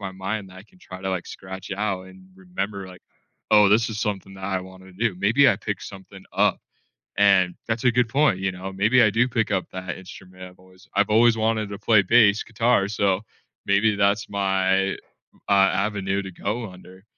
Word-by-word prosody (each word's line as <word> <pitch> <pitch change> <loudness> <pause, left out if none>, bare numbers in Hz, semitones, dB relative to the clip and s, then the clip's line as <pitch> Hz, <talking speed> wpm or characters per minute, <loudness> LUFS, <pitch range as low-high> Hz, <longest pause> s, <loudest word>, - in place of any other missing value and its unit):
my 95 -1 -6
mind 95 +1 -5
that 90 - -14
I - - -12
can 180 - -25
try 95 - -11
to, 95 - -2
like, 90 -2 -3
scratch 95 0 -9
it 95 - -3
out 100 -3 -2
and 95 0 -15
remember, 95 +1 -5
like, 90 - -14 0.5
"Oh, 105 -1 +6
this 110 +3 +3
is 105 0 -5
something 95 -2 -4
that 95 0 -9
I 95 -1 -1
wanna 95 0 -13
do," 100 +1 -1
maybe 115 +9 +4
I 105 - +2
pick 105 -1 -5
something 95 0 -11
up - - +1 0.6
and 95 -3 +4
that's 110 +1 -2
a 125 - +4
good 125 0 +2
point, 140 -9 +2
you 95 -1 -1
know? 95 +2 -7
Maybe 110 +6 +3
I 105 - +5
do 120 +4 +2
pick 115 -4 -1
up 95 -2 -1
that 95 -1 -6
instrument 95 0 -13
I've 90 0 -14
always 95 +1 -20
I've 100 +1 +2
always 115 +1 +4
wanted 110 -1 -1
to 100 - -6
play 105 -1 +4
bass 110 0 +4
guitar, 115 -3 +1
so, 100 -1 0 0.4
maybe 105 +2 +3
that's 100 +1 +1
my, 95 -1 +1 0.5
uh, - - +2
avenue 100 0 +1
to 95 - -8
go 110 +5 -4
under. 90 +1 -15
100 Hz, 205 wpm, -23 LUFS, 95-110 Hz, 0.6 s, Oh